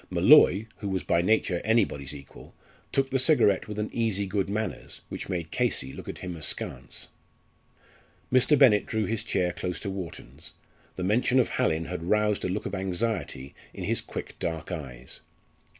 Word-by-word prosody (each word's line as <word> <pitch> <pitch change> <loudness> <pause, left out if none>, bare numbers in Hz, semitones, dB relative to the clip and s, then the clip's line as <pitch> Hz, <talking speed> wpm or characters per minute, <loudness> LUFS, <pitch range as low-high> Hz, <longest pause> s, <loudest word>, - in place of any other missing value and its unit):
Molloy, 100 +4 +6
who 100 - -4
was 95 -1 -1
by 85 0 +2
nature 90 -2 +1
anybody's 100 - +1
equal, 70 -2 -12 0.4
took 135 -1 +1
the 135 - +2
cigarette 130 - +3
with 105 -1 -6
an 105 0 -2
easy 110 -4 0
good 95 0 -1
manners, 110 +2 -4
which - - -6
made 85 -3 -3
Casey 65 0 0
look - - -8
at - - -6
him 90 -2 -6
askance. 75 -5 -4 1.3
Mr. 130 +4 +5
Bennett 115 -7 +5
drew 110 -1 0
his 110 -1 -2
chair 90 -1 0
close 90 0 -4
to 100 - -3
Wharton's. 95 -5 -8 0.4
The 90 - -4
mention 120 +6 +3
of 125 - +2
Hallin 80 +1 0
had 90 -1 -5
roused 105 -1 +2
a - - -1
look 95 +4 -3
of 100 - -4
anxiety 95 - -2 0.2
in - - -6
his - - 0
quick - - -8
dark 80 +1 -3
eyes. 65 -7 -7
95 Hz, 170 wpm, -27 LUFS, 85-110 Hz, 1.3 s, Molloy